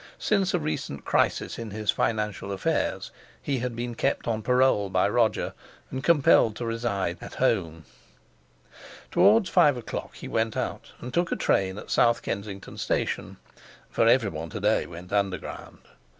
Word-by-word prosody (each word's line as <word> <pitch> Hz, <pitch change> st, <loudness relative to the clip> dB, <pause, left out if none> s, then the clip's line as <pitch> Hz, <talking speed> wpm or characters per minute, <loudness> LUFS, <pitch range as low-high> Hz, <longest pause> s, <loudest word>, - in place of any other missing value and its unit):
Since 195 Hz, -3 st, +1 dB
a -, -, +1 dB
recent 140 Hz, -, -4 dB
crisis -, -, 0 dB
in 115 Hz, -1 st, -5 dB
his 105 Hz, +1 st, 0 dB
financial 105 Hz, -3 st, -1 dB
affairs 95 Hz, -1 st, -1 dB, 0.3 s
he 135 Hz, -3 st, -2 dB
had 120 Hz, -1 st, -3 dB
been 120 Hz, +1 st, -4 dB
kept -, -, -1 dB
on 110 Hz, -2 st, -1 dB
parole 125 Hz, -4 st, +3 dB
by -, -, +2 dB
Roger, -, -, +1 dB, 0.4 s
and 130 Hz, 0 st, -4 dB
compelled 145 Hz, -8 st, +4 dB
to 120 Hz, -, -4 dB
reside 115 Hz, -6 st, -2 dB
"at -, -, -9 dB
home." 80 Hz, -1 st, 0 dB, 1.3 s
Towards 200 Hz, +3 st, +5 dB
five 150 Hz, -7 st, +5 dB
o'clock 120 Hz, -, -6 dB
he -, -, -8 dB
went 110 Hz, -1 st, -1 dB
out, -, -, -4 dB
and 125 Hz, +1 st, -7 dB
took 175 Hz, 0 st, +1 dB
train 95 Hz, 0 st, +1 dB
at -, -, -9 dB
South 120 Hz, 0 st, +3 dB
Kensington 100 Hz, -1 st, -5 dB
Station -, -, -2 dB, 0.5 s
(for 115 Hz, -, +2 dB
everyone 100 Hz, -10 st, +2 dB
to 110 Hz, -, -5 dB
day 105 Hz, +2 st, +1 dB
went 90 Hz, +2 st, -10 dB
Underground). 100 Hz, -2 st, -2 dB
115 Hz, 150 wpm, -26 LUFS, 100-130 Hz, 1.3 s, Towards